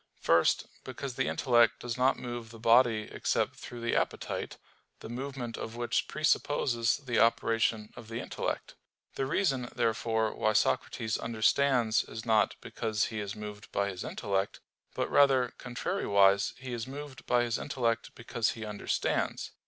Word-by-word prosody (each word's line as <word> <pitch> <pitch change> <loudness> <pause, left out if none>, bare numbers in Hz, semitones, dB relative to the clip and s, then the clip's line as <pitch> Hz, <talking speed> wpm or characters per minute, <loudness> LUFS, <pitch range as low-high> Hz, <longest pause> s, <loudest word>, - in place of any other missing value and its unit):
First, 85 0 +3 0.2
because 135 -2 -6
the 130 +2 -1
intellect 120 -3 +3
does 120 -1 -3
not 130 +2 +3
move 120 -2 -6
the 115 - -11
body 115 -1 +4
except - - 0
through 120 -1 -9
the 120 - 0
appetite, - - -2 0.4
the - - -9
movement 125 -1 -5
of 110 - -6
which 120 -1 0
presupposes 140 -6 +1
the 125 -4 -1
operation 115 -1 +2
of 115 - -10
the 115 +1 -4
intellect. - - -4 0.4
The 135 - -2
reason 135 -6 0
therefore 115 -2 +1
why 110 - +1
Socrates 110 +1 0
understands 115 +1 +2
is 110 +1 -8
not 110 -2 +3
because 110 -1 -1
he 110 - -2
is 100 -1 -4
moved 105 -1 -8
by 100 0 0
his 95 -2 -6
intellect, 100 0 -2 0.4
but - - 0
rather, 135 -3 +4
contrariwise, 100 - +2
he 130 -1 -7
is 115 0 -4
moved 145 +1 -8
by 120 -1 +3
his 120 -1 -1
intellect 115 -4 -1
because 115 -1 -1
he 110 -1 -7
understands. 105 -1 -1
115 Hz, 155 wpm, -30 LUFS, 110-125 Hz, 0.4 s, body